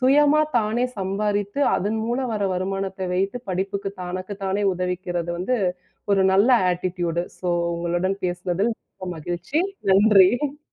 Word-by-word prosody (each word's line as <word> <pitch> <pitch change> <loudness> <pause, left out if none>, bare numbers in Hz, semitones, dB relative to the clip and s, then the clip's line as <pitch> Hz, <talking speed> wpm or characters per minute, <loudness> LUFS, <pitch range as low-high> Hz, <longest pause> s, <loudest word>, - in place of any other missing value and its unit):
சுயமா 295 +3 +5 0.2
தானே 225 +3 0
சம்பாரித்து 205 +4 -1 0.2
அதன் 215 +3 -1
மூலம் 245 +1 -1
வர 205 - -2
வருமானத்த 190 0 -3
வைத்துப் 195 +5 -2
படிப்புக்கு 195 +2 -2
தனக்குத் 185 +3 -6
தானே 195 +2 0
உதவிக்கிறது 180 -1 -2
வந்து 250 +8 0 0.6
ஒரு 195 - +3
நல்ல 200 +6 +4 0.2
ஆட்டிட்யூடு. 175 -1 -2 0.2
ஸோ 180 - -5 0.3
உங்களுடன் 175 +3 -1
பேசுனதில் 180 +5 -1
மிக்க 185 -4 -10
மகிழ்ச்சி. 175 - -2 0.3
நன்றி. 215 +8 +4
195 Hz, 125 wpm, -23 LUFS, 180-215 Hz, 0.6 s, சுயமா